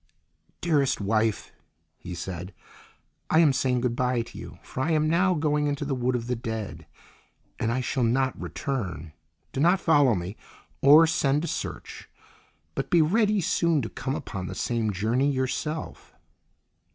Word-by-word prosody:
"Dearest 145 -6 +2
wife," 110 +1 0 0.5
he 90 - -7
said, 90 +1 -6 0.7
"I 155 - +3
am 160 -4 +5
saying 125 -2 +1
good 120 -1 0
bye 125 -1 0
to 115 - -15
you, - - -9
for 130 - -5
I 150 - 0
am 155 0 +2
now 180 +3 +3
going 150 -1 +1
into 145 0 -2
the 140 - -1
Wood 125 0 0
of 120 -1 -2
the 125 +1 -1
Dead, 110 -3 -5 0.7
and 115 - 0
I 130 +2 0
shall 130 +1 -2
not 130 +3 +1
return. 95 - -4 0.4
Do - - -3
not 175 +6 +4
follow 145 - +4
me, 90 +3 -5 0.4
or 150 +4 +8
send 150 -2 +1
to - - -2
search, - - -6 0.6
but - - -3
be 170 -2 +5
ready 210 +4 +2
soon 170 -5 +1
to 110 - -4
come 135 +1 -4
upon 95 -9 -5
the - - -6
same 115 -3 -1
journey 115 +8 +1
yourself." 145 +4 -3
130 Hz, 165 wpm, -26 LUFS, 115-155 Hz, 0.7 s, or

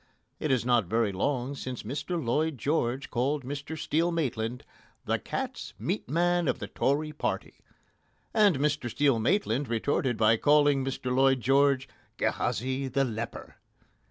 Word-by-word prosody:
It 155 - -2
is 125 -3 +2
not 120 -4 +3
very 110 +1 +1
long 125 +7 -1
since 130 -3 -6
Mr 145 - -3
Lloyd 150 +3 0
George 135 0 -1
called 135 +4 0
Mr 145 +3 -5
Steel 165 +3 +1
Maitland 125 -7 -2 0.4
"the - - 0
cat's - - -5
meat 110 +3 -3
man 175 +2 +2
of - - +1
the - - -5
Tory 150 +3 0
party," 150 - -3 0.7
and 205 -8 +4
Mr 145 -3 0
Steel 140 -1 +2
Maitland 135 - +1
retorted 120 +1 0
by 110 +1 +4
calling 145 0 +4
Mr 130 -1 -2
Lloyd 135 0 +4
George 135 +1 +3 0.3
"Gehazi, 130 +4 -1
the 135 +2 +1
leper." 115 -2 -5
135 Hz, 145 wpm, -28 LUFS, 120-150 Hz, 0.7 s, and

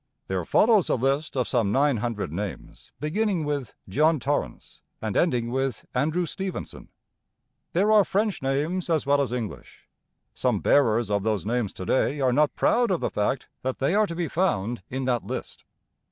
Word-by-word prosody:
There 95 -2 -2
follows 215 - +4
a - - +3
list 135 +4 -1
of 125 - +1
some 115 -6 +1
nine 140 +1 +3
hundred 105 -7 -3
names, 95 0 -6
beginning 175 +3 0
with 145 -5 -3
John 155 - +3
Torrance 145 +4 -3 0.2
and 110 -2 -3
ending 120 -9 +1
with 135 0 -2
Andrew 155 +7 +1
Stevenson. 190 +3 -6 0.8
There 200 +5 +3
are 215 -1 +7
French 205 +1 -1
names 150 +7 -1
as 160 -4 +1
well 140 0 +3
as 130 -4 -1
English. 120 -4 -6 0.5
Some - - 0
bearers 115 -5 +3
of 100 0 +1
those 105 -4 -1
names 115 -2 -1
to 95 - -7
day 135 +7 +1
are 130 -2 +2
not 150 +2 +2
proud 240 0 +2
of 180 -3 +1
the - - -2
fact 105 +6 -1
that 130 0 -2
they 135 +6 +1
are 210 +1 +3
to 170 - -5
be 170 -1 -1
found 120 - 0
in 130 +1 -3
that 125 -2 0
list. - - -6
135 Hz, 180 wpm, -25 LUFS, 120-165 Hz, 0.8 s, are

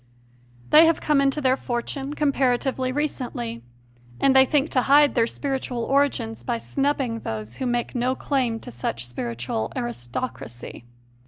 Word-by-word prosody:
They 320 +2 +8
have 330 - +2
come 295 -2 +2
into 275 +2 +1
their 260 -1 +3
fortune 270 +3 -4
comparatively 265 -2 +1
recently, 245 - -3 0.6
and 270 -1 +4
they 265 0 +8
think 295 +3 +1
to 255 - +3
hide 285 +2 +5
their 230 -2 +2
spiritual 265 -3 -3
origins 265 - 0
by 120 - -2
snubbing 245 - -1
those 110 - -5
who 260 - -2
make 240 0 -1
no 250 +1 0
claim 255 -6 -1
to - - -9
such 120 0 -3
spiritual 120 -2 -4
aristocracy. 120 - -6
255 Hz, 145 wpm, -24 LUFS, -, 0.6 s, They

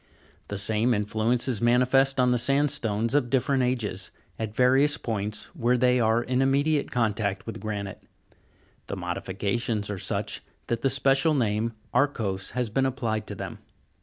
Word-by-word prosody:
The 100 - -4
same 110 +4 +2
influence 110 +4 0
is 120 -6 -1
manifest 125 +3 +3
on 125 -1 +4
the 125 - +2
sandstones 120 -5 +1
of 140 -4 +2
different 135 +1 +2
ages, 115 -7 -1 0.3
at 110 -1 -4
various 135 +4 +4
points 105 -1 -4
where 125 -4 +2
they 125 0 +3
are 115 +1 +2
in 125 +1 0
immediate 140 +2 +2
contact 105 -4 -1
with 115 - -6
granite: 100 -2 -5 0.9
the - - -4
modifications 100 +4 -2
are 100 - -4
such - - -2 0.2
that 115 - -2
the 135 - +2
special 135 +4 +3
name, 115 -2 0 0.2
arkose, 115 -8 0
has 125 -1 0
been 135 +3 +2
applied 115 -5 -2
to - - -5
them. - - -7
120 Hz, 155 wpm, -26 LUFS, 105-130 Hz, 0.9 s, on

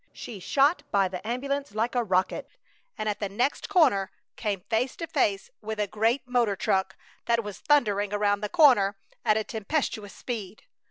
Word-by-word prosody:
She 215 -5 -8
shot 280 - +2
by 195 -3 +2
the 180 +2 -7
ambulance 275 0 -2
like 225 +3 0
a 245 -1 +1
rocket, 185 -3 0 0.5
and 215 - -3
at 210 - -1
the 205 - -2
next 245 +8 -1
corner 265 - +4 0.3
came 205 -4 -2
face 230 +6 -1
to 335 - -4
face 255 -11 0
with 220 0 -5
a 210 - +2
great 225 +5 0
motor 240 -5 +2
truck 190 0 0 0.3
that 235 0 +2
was 205 -2 -7
thundering 205 -9 +2
around 205 0 +1
the 210 - -2
corner 240 - +5 0.3
at 215 - +3
a 220 - 0
tempestuous 220 -2 -3
speed. 220 -5 -6
215 Hz, 175 wpm, -27 LUFS, 200-250 Hz, 0.5 s, corner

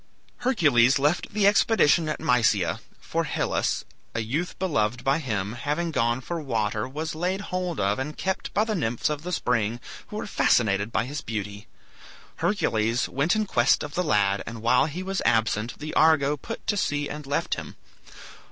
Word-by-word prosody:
Hercules 145 - +4
left 150 +5 0
the 210 -1 +1
expedition 195 -6 +4
at 155 - -3
Mysia, 115 - +2 0.2
for - - -2
Hylas, - - -1 0.3
a 115 - 0
youth 145 +11 -3
beloved 125 - 0
by 135 +3 +2
him, 105 -8 -2
having 150 +7 -2
gone 120 -3 +1
for 170 +4 -4
water, 110 -5 -1
was 155 +5 -4
laid 180 +4 -1
hold 180 -3 -3
of 100 +3 +1
and 150 +3 -4
kept 190 0 -2
by 210 - +2
the 220 -1 -2
nymphs 120 - -1
of 150 -1 -3
the 180 +3 -5
spring, 120 -7 0 0.3
who - - -9
were - - -3
fascinated 105 -1 +2
by 105 - 0
his 145 +4 -5
beauty. 105 -1 -5 0.7
Hercules 115 - +1
went 145 +9 +1
in 215 0 +1
quest 125 -9 +2
of 145 -1 -7
the 180 - 0
lad, 100 - +2
and 115 -1 -7
while 120 +4 +4
he 170 +5 -5
was 195 0 -2
absent 115 0 +1
the 155 +1 -6
"Argo" 150 -2 +4
put 225 +11 -8
to 205 - 0
sea 145 -5 0
and 150 -1 -7
left 140 - -1
him. - - -6
140 Hz, 180 wpm, -25 LUFS, 115-170 Hz, 0.7 s, Hercules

